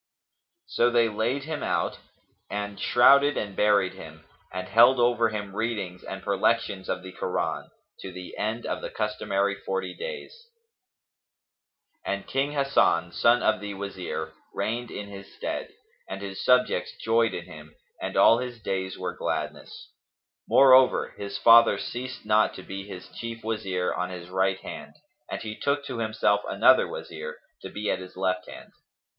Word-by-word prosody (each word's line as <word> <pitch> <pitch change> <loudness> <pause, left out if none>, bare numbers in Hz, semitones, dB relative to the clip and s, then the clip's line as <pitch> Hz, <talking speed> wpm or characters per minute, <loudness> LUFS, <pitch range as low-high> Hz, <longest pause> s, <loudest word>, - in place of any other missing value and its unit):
So 120 - +2
they 120 -1 +3
laid 115 +6 -1
him 155 0 -4
out - - -1 0.5
and 105 0 -4
shrouded 140 +4 +5
and 100 -2 -3
buried 105 -3 +3
him 80 0 -12 0.3
and 95 0 -5
held 120 +3 +6
over 120 -1 +3
him 100 -2 -5
readings 105 -6 -3
and 95 0 -7
perlections 100 -1 0
of 90 - -2
the 95 - -8
Koran, - - -3 0.3
to 95 - -7
the 90 0 -9
end 110 +3 -3
of - - -3
the - - -5
customary 100 -2 -1
forty 95 -1 -4
days. 480 0 -7 1.7
And 100 0 -3
King 140 +2 -1
Hasan, 135 - +2
son 120 +6 +3
of - - +2
the 100 0 -6
Wazir, 100 -2 -5 0.2
reigned 120 +2 -2
in 105 - -6
his 100 -1 -11
stead, - - -4 0.4
and 95 - -5
his 95 -1 -6
subjects 125 0 +2
joyed 115 0 +2
in 85 - -6
him 75 0 -13 0.3
and - - -3
all 115 - +6
his 125 -2 -5
days 95 -3 -3
were 90 -1 -4
gladness; - - -5 0.6
moreover, 130 -1 +6
his 100 0 -5
father 115 0 +7
ceased 125 -1 -6
not 110 0 +3
to 95 - -9
be 95 +1 -7
his 95 -3 -9
chief 115 -1 -7
Wazir 95 -5 -1
on 90 0 -2
his 90 -1 -8
right 95 0 +1
hand, - - -9 0.3
and - - -5
he 105 -1 -5
took 140 +3 -1
to 130 -4 -5
himself 110 -2 +1
another - - +5
Wazir, 485 0 -7 0.2
to - - -7
be 105 0 -2
at - - -1
his 90 0 -11
left 90 -1 -1
hand. - - -11
105 Hz, 160 wpm, -26 LUFS, 95-120 Hz, 1.7 s, father